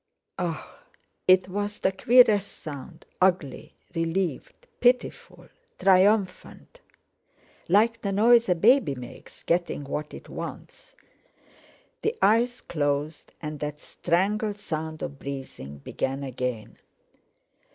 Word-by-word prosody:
"Ah!" -, -, -4 dB, 0.5 s
It 185 Hz, 0 st, +6 dB
was 205 Hz, +2 st, -3 dB
the 190 Hz, -, +1 dB
queerest 215 Hz, -1 st, +5 dB
sound, 155 Hz, +2 st, -9 dB, 0.2 s
ugly, 170 Hz, -4 st, 0 dB, 0.2 s
relieved, 180 Hz, -, -2 dB
pitiful, 250 Hz, +1 st, 0 dB, 0.3 s
triumphant—like 205 Hz, -, 0 dB
the 200 Hz, -, -2 dB
noise 230 Hz, +2 st, +5 dB
a 180 Hz, -, +4 dB
baby 205 Hz, -, +4 dB
makes 125 Hz, -1 st, -12 dB
getting 170 Hz, -3 st, 0 dB
what 150 Hz, +2 st, -4 dB
it -, -, -12 dB
wants. -, -, -9 dB, 1.1 s
The 440 Hz, +2 st, 0 dB
eyes 240 Hz, +3 st, +3 dB
closed, 145 Hz, 0 st, -2 dB
and 150 Hz, -1 st, -5 dB
that 150 Hz, 0 st, -4 dB
strangled 205 Hz, +7 st, -1 dB
sound 160 Hz, -4 st, -5 dB
of 140 Hz, -, -6 dB
breathing 135 Hz, -, -7 dB
began 135 Hz, -, -3 dB
again. 125 Hz, -4 st, -4 dB
180 Hz, 100 wpm, -26 LUFS, 150-210 Hz, 1.1 s, It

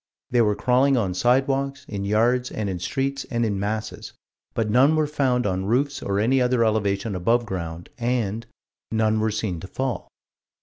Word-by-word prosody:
They 120 Hz, -1 st, +4 dB
were 105 Hz, -2 st, +2 dB
crawling 130 Hz, +4 st, +3 dB
on 100 Hz, -6 st, 0 dB
sidewalks, 135 Hz, +5 st, +1 dB
in 100 Hz, -2 st, -4 dB
yards, 120 Hz, +5 st, +2 dB
and 105 Hz, -2 st, -3 dB
in 90 Hz, -, -4 dB
streets, 135 Hz, +7 st, -2 dB
and 120 Hz, -1 st, 0 dB
in 100 Hz, -3 st, -1 dB
masses 110 Hz, +2 st, -4 dB, 0.4 s
but 115 Hz, -2 st, 0 dB
"none 130 Hz, +8 st, +4 dB
were 155 Hz, -1 st, +2 dB
found 130 Hz, -5 st, 0 dB
on 95 Hz, -1 st, -1 dB
roofs 140 Hz, +5 st, 0 dB
or 100 Hz, 0 st, -1 dB
any 130 Hz, +5 st, +3 dB
other 125 Hz, -2 st, +2 dB
elevation 105 Hz, -1 st, 0 dB
above 115 Hz, +7 st, +1 dB
ground" 85 Hz, -4 st, -6 dB
and 115 Hz, -2 st, -1 dB, 0.4 s
"none 110 Hz, -1 st, +2 dB
were 110 Hz, +1 st, +1 dB
seen 105 Hz, -5 st, -2 dB
to 95 Hz, -, -8 dB
fall." 130 Hz, -1 st, -3 dB
115 Hz, 175 wpm, -24 LUFS, 100-125 Hz, 0.4 s, They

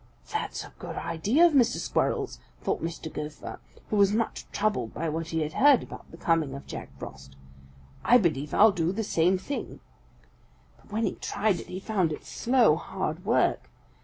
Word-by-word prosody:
"'That's 435 Hz, -, -2 dB
a -, -, -13 dB
good -, -, -6 dB
idea 205 Hz, -, +2 dB
of 340 Hz, -, +4 dB
Mr. 245 Hz, -4 st, +4 dB
Squirrel's,' -, -, -1 dB, 0.2 s
thought -, -, -1 dB
Mr. 165 Hz, -1 st, -5 dB
Gopher, 150 Hz, 0 st, -6 dB, 0.3 s
who 215 Hz, -, +2 dB
was 200 Hz, 0 st, +5 dB
much 230 Hz, +1 st, -1 dB
troubled 205 Hz, -, -1 dB
by 165 Hz, -, -2 dB
what 160 Hz, +1 st, -3 dB
he 160 Hz, -1 st, -1 dB
had 155 Hz, 0 st, -2 dB
heard 280 Hz, -2 st, +5 dB
about -, -, -11 dB
the 165 Hz, -, -12 dB
coming 160 Hz, -5 st, +1 dB
of 140 Hz, -, -9 dB
Jack -, -, -7 dB
Frost. 65 Hz, 0 st, -10 dB, 0.7 s
'I 245 Hz, -, +7 dB
believe 150 Hz, -, 0 dB
I'll 220 Hz, +1 st, +6 dB
do 170 Hz, -2 st, 0 dB
the 220 Hz, +4 st, -2 dB
same 180 Hz, -2 st, +2 dB
thing.' 280 Hz, +10 st, -5 dB, 1.0 s
But -, -, -22 dB
when 220 Hz, +2 st, -1 dB
he -, -, 0 dB
tried 200 Hz, -4 st, 0 dB
it, -, -, -9 dB
he 185 Hz, -, -5 dB
found 190 Hz, -5 st, 0 dB
it 150 Hz, -, -6 dB
slow, 235 Hz, -10 st, +3 dB
hard 180 Hz, -1 st, -4 dB
work. 230 Hz, -, +2 dB
185 Hz, 185 wpm, -27 LUFS, 160-220 Hz, 1.0 s, I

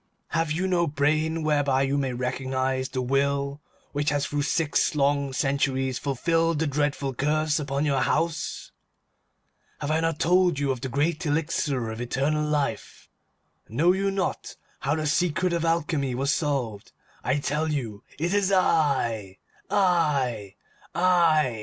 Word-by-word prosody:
Have 165 Hz, -2 st, 0 dB
you 175 Hz, +5 st, 0 dB
no 175 Hz, -2 st, +2 dB
brain 155 Hz, +3 st, 0 dB
whereby 145 Hz, -3 st, +2 dB
you 135 Hz, +1 st, 0 dB
may 135 Hz, -2 st, 0 dB
recognize 130 Hz, +1 st, -2 dB
the 130 Hz, -1 st, -2 dB
will 140 Hz, +2 st, 0 dB, 0.3 s
which 145 Hz, +1 st, 0 dB
has 145 Hz, -1 st, 0 dB
through 145 Hz, 0 st, -2 dB
six 155 Hz, +2 st, +1 dB
long 140 Hz, -1 st, +1 dB
centuries 135 Hz, -1 st, 0 dB
fulfilled 165 Hz, +4 st, +1 dB
the 160 Hz, -, 0 dB
dreadful 145 Hz, -1 st, -1 dB
curse 150 Hz, +3 st, +1 dB
upon 140 Hz, 0 st, -1 dB
your 140 Hz, -2 st, +1 dB
house? 165 Hz, +1 st, -1 dB, 1.1 s
Have 145 Hz, +1 st, -2 dB
I 160 Hz, -, +2 dB
not 165 Hz, -1 st, 0 dB
told 175 Hz, 0 st, +3 dB
you 140 Hz, -1 st, 0 dB
of 130 Hz, -3 st, -4 dB
the 130 Hz, -, -3 dB
great 150 Hz, +6 st, 0 dB
elixir 145 Hz, -6 st, -1 dB
of 110 Hz, +1 st, -6 dB
eternal 140 Hz, +5 st, 0 dB
life? 145 Hz, -7 st, -2 dB, 0.6 s
Know 150 Hz, +11 st, +3 dB
you 195 Hz, +1 st, 0 dB
not 195 Hz, -1 st, -3 dB, 0.2 s
how 140 Hz, +2 st, 0 dB
the 155 Hz, -1 st, -2 dB
secret 175 Hz, +3 st, +1 dB
of 170 Hz, -1 st, 0 dB
Alchemy 155 Hz, -5 st, 0 dB
was 140 Hz, +3 st, +1 dB
solved? 130 Hz, -9 st, -2 dB, 0.3 s
I 130 Hz, +3 st, +1 dB
tell 150 Hz, +3 st, -1 dB
you, 115 Hz, -8 st, -4 dB
it 170 Hz, +5 st, -1 dB
is 200 Hz, -1 st, +2 dB
I! 130 Hz, -, +1 dB, 0.3 s
I! 140 Hz, -, +1 dB, 0.4 s
I! 165 Hz, -9 st, +3 dB
145 Hz, 145 wpm, -26 LUFS, 135-160 Hz, 1.1 s, told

